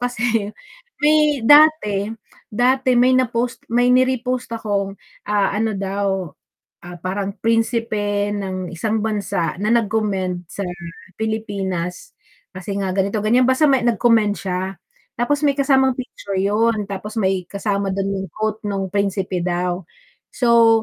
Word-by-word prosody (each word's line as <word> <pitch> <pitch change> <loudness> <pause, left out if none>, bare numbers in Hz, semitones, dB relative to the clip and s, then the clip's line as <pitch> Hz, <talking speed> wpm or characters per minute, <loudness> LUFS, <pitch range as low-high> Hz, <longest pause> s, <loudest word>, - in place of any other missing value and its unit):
kasi 235 -3 0 0.5
may 300 -2 +3
dati 290 -9 +5 0.4
dati 255 +3 +2
may 250 +1 +5
na 255 - +4
post 235 +1 -3
may 245 +1 +3
ni-repost 255 -1 +1
akong, 200 -3 -2 0.4
ah, 205 -1 +2
ano 220 0 0
daw, 195 -2 -2 0.6
ah, 175 0 -8
parang 195 +2 -3
prinsipe 225 -3 0
ng 190 -3 -4
isang 220 +4 -1
bansa 205 -7 -1
na 215 +3 +1
nag-commend 200 -5 0
sa 200 - -4 0.5
Pilipinas, 200 -5 -3 0.4
kasi 195 +2 -5
nga 190 -1 -1
ganito-ganyan 215 +5 +2
basta 260 +4 +3
may 270 -2 +4
nag-comment 225 -2 +3
siya. 185 -1 -3 0.6
Tapos 290 +5 0
may 280 - +3
kasamang 265 -2 +3
picture 205 -6 -6
yun, 210 +2 +1
tapos 200 +2 -6
may 190 -3 0
kasama 200 +1 -2
dun 195 0 -1
yung 190 - -4
quote 215 0 -2
nung 195 -2 -2
principe 195 -2 -1
daw. 180 +1 -1 0.5
So, 230 -2 +4
210 Hz, 130 wpm, -20 LUFS, 195-240 Hz, 0.6 s, dati